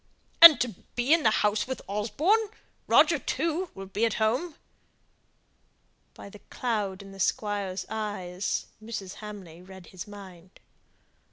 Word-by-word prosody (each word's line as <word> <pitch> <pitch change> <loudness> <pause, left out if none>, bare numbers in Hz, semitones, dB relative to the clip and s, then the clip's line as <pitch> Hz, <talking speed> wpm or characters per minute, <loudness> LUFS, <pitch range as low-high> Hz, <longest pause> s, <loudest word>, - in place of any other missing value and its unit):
"And 330 -3 +11
to 245 - 0 0.3
be 245 +5 +2
in 330 - +4
the 250 - +4 0.2
house 210 +2 0
with 260 -1 -4
Osborne! 310 - 0 0.4
Roger, 310 -1 +5
too, 335 +6 -2
will 195 - -8
be 195 +3 -3
at 225 -3 +1
home." 250 +10 -1 1.6
By - - -11
the 205 +1 -13
cloud 205 -6 -3
in 195 - -13
the 195 - -13
Squire's 200 -2 -2
eyes, 205 -4 -4 0.2
Mrs. 205 -4 -6
Hamley 195 -6 -10
read 190 -1 -13
his 185 +1 -8
mind. 190 -3 -13
210 Hz, 140 wpm, -27 LUFS, 195-250 Hz, 1.6 s, And